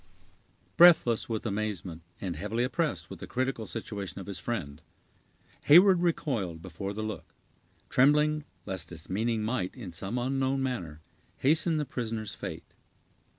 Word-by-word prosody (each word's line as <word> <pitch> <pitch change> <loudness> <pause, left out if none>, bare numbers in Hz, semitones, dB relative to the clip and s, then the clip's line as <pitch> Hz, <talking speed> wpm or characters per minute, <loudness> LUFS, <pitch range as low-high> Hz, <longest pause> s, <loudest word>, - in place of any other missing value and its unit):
Breathless 165 -11 +6
with 110 0 -3
amazement, 100 -6 -3 0.2
and 90 -4 -3
heavily 105 +8 -1
oppressed 145 +5 -1
with - - -8
the - - -7
critical 130 -3 -2
situation 100 -4 -5
of 95 - -7
his 100 -2 -6
friend, 80 -11 -4 0.8
Heyward 180 +4 +7
recoiled 120 - -1
before 95 +3 -6
the 110 +2 -4
look, 110 0 -6 0.5
trembling 150 +3 +4 0.2
lest 95 -2 -4
its 85 0 -9
meaning 110 +2 0
might, 105 -5 -2
in 110 -9 -8
some 95 +8 -4
unknown 135 +1 0
manner, 90 - -4 0.4
hasten 155 +3 +3
the 150 - 0
prisoner's 110 -5 -4
fate. - - -7
115 Hz, 140 wpm, -29 LUFS, 95-135 Hz, 0.8 s, Heyward